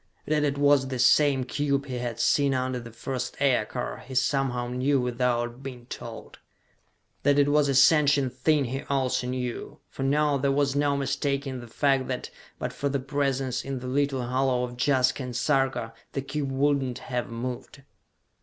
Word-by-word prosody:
That 150 0 +1
it 140 -1 0
was 145 -2 +4
the 130 -1 -3
same 135 +2 +4
cube 140 +1 -1
he 125 -3 -4
had 120 -2 -4
seen 140 +2 +3
under 130 0 -1
the 120 -1 -9
first 125 +2 -4
aircar, 125 -3 0
he 130 +1 -10
somehow 130 -2 +1
knew 130 +3 +1
without 120 0 -1
being 125 -3 -8
told. 115 -1 -8 0.8
That 145 0 +3
it 145 0 +4
was 145 -1 +3
a 135 - +1
sentient 140 -2 +4
thing 145 +2 +2
he 135 +3 -3
also 130 -2 0
knew, 125 -1 -4
for - - -8
now 145 +1 +2
there 140 +1 +1
was 140 0 +1
no 145 0 +2
mistaking 140 -1 -1
the 120 - -10
fact 135 +2 +1
that, 130 -1 -4 0.3
but - - -4
for 140 - -2
the 140 0 -1
presence 135 -2 -1
in 135 -1 -4
the 125 - -7
little 135 -1 0
hollow 130 0 +1
of 125 0 -5
Jaska 135 -1 +2
and 125 -2 -5
Sarka, 130 -2 0 0.2
the 135 - -1
cube 140 0 -3
would 140 +1 +2
not 125 -2 -3
have 125 -2 -4
moved. 125 +3 -6
135 Hz, 180 wpm, -26 LUFS, 125-140 Hz, 0.8 s, was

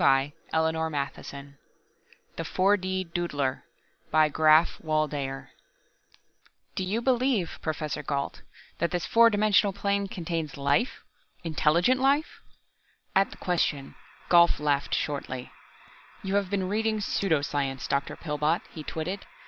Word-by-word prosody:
The 135 +1 +4 0.2
mouth 160 0 +2
moved 160 0 -2
rapidly_ 140 0 -5 0.4
] - - -32
The - - -3
4 195 +2 +3
D 185 -1 -2
DOODLER 165 -6 -2 0.5
by 155 0 +4
GRAPH 155 +2 +4
WALDEYER 150 -4 -2 1.2
"Do - - -2
you 210 +6 -1
believe, 250 -7 +1
Professor 155 -2 -3
Gault, 140 -1 -3 0.4
that 170 - +1
this 175 -1 -2
four 230 0 +6
dimensional 205 -2 +3
plane 200 0 0
contains 165 -5 -4
life 140 - 0 0.4
intelligent 170 +9 +2
life?" 280 +4 +1 0.7
At 195 +1 +4
the - - -12
question, 160 -6 -1 0.3
Gault 170 -2 +5
laughed 145 -1 +1
shortly. 130 -4 -3 0.7
"You 195 0 -3
have 200 -2 +1
been 190 -2 -1
reading 215 +2 0
pseudo 185 -7 0
science, 135 -3 -2
Dr. 140 0 -1
Pillbot," 150 +1 -1
he 160 - -8
twitted. 165 +6 -5
165 Hz, 130 wpm, -27 LUFS, 145-195 Hz, 1.2 s, four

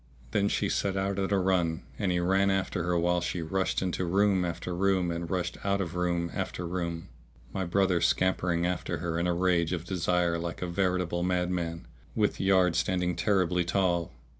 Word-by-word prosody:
Then 100 0 +2
she - - 0
set 95 -1 0
out 95 0 -1
at 95 0 -1
a 100 - +3
run 90 -3 +1 0.2
and 100 -4 +1
he 90 - +1
ran 95 +3 +2
after 95 -1 0
her 90 -1 +1
while 90 +1 +2
she 90 -1 -2
rushed 95 +3 -1
into 90 0 -1
room 95 +1 +2
after 85 +1 -3
room 95 -1 +1
and 85 0 -4
rushed 90 -1 -2
out 100 0 +1
of 85 -3 -3
room 85 -1 -1
after 90 - -3
room, 85 -1 -4 0.4
my 95 - -1
brother 90 -1 +2
scampering 90 0 +1
after 90 -1 -2
her 85 +1 -2
in 85 - 0
a 90 - +2
rage 90 -1 +2
of 85 -1 -3
desire 90 -2 0
like 85 +1 -4
a - - -2
veritable 90 -1 0
madman, 90 -3 -1 0.3
with - - +1
yard 95 -3 +3
standing 90 0 0
terribly 90 0 +2
tall. 85 -1 0
90 Hz, 190 wpm, -29 LUFS, 85-95 Hz, 0.4 s, a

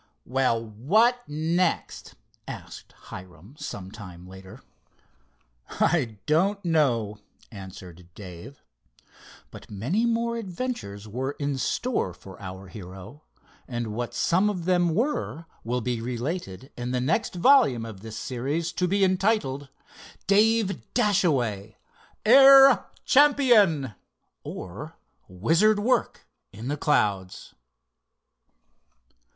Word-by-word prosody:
"Well, 125 -3 0
what 210 - +2
next?" 165 +4 -1 0.3
asked - - -9
Hiram, 90 - -12
some 95 -1 -7
time 90 -5 -11
later. 95 +6 -13 1.1
"I 125 -11 0
don't 190 +6 +1
know," 120 -11 +1 0.3
answered 90 -4 -11
Dave. 100 +7 -11 0.9
But - - -12
many 140 - -1
more 235 0 0
adventures 180 - -5
were 130 +6 -3
in 140 -1 -3
store 130 - -1
for 95 0 -13
our 95 0 -8
hero, 95 - -11 0.5
and 120 -4 -4
what 120 +2 -4
some 190 +5 +2
of 180 -5 -4
them 175 -3 +2
were 230 - -2 0.2
will 125 +2 -2
be 120 0 -2
related 125 - -5
in 120 0 -5
the 125 0 -1
next 160 - 0
volume 180 - +4
of 110 -4 -9
this 110 +2 -8
series, 145 +7 -3
to 180 - -1
be 200 +2 +1
entitled: 185 -8 0 0.6
"Dave 210 0 +2
Dashaway, 135 - +1 0.5
Air 270 +2 +8 0.2
Champion; 235 - +4 0.5
Or, - - -8 0.3
Wizard 165 - +2
Work 225 +5 0 0.3
in 115 +5 -7
the 145 - 0
Clouds." 100 - -1
135 Hz, 105 wpm, -25 LUFS, -, 1.1 s, Air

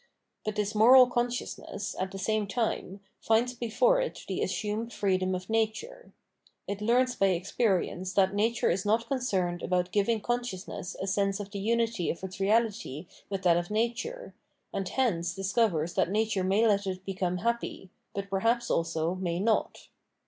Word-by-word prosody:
But 215 -1 -3
this 210 0 -1
moral 250 +4 +8
con 245 0 +1
sciousness, 240 -4 -5
at 190 - -1
the 195 - -8
same 215 +1 0
time, 200 -3 -2 0.2
finds 230 +3 +2
before 370 - +2
it - - -5
the 190 - -2
assumed 210 +5 -2
freedom 185 -3 0
of 185 0 -6
nature: 225 - -2 0.6
it 200 0 -4
learns 250 +3 +2
by 195 - +3
experience 185 0 0
that 190 -1 +3
nature 225 +3 +1
is 180 +2 -1
not 225 +2 +1
concerned 190 -10 -1
about 180 0 0
giving 215 +2 +2
cou^ciousness 215 -6 -4
a - - -2
sense 195 0 0
of 205 -1 -6
the 200 - -4
unity 225 -3 0
of 170 - -4
its 190 0 -6
reality 205 - 0 0.2
with 195 -1 -3
that 170 -2 +5
of 175 +2 -2
nature, 235 - -2 0.4
and 195 -2 -2
hence 175 -10 0
discovers 195 -5 +1
that - - +1
nature 210 -1 0
may 195 +5 +3
let 200 -2 +2
it 185 0 -4
become 185 -2 -1
happy, 230 -3 -3 0.2
but 200 0 -3
perhaps 230 +5 +1
also 165 0 0
may 180 -2 -2
not. 220 +3 0
205 Hz, 165 wpm, -29 LUFS, 185-230 Hz, 0.6 s, moral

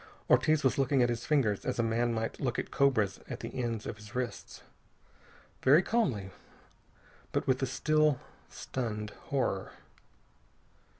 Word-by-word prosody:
Ortiz 155 -1 +4
was 130 +1 +2
looking 135 -1 +3
at 120 - +2
his 120 0 -3
fingers 125 -10 +2
as - - -2
a 115 - +2
man 115 +1 +1
might 115 0 -3
look 125 -4 -1
at - - -3
cobras 110 -8 +2
at - - -5
the - - -6
ends 115 -3 -2
of - - -5
his 105 0 -13
wrists. 125 -1 -4 1.0
Very 150 +7 +6
calmly, 125 - 0 1.0
but - - -1
with 130 0 +1
a 135 - +1
still, 150 +2 +2 0.3
stunned 105 -4 -4 0.2
horror. 125 -8 -1
125 Hz, 145 wpm, -31 LUFS, 110-140 Hz, 1.0 s, Very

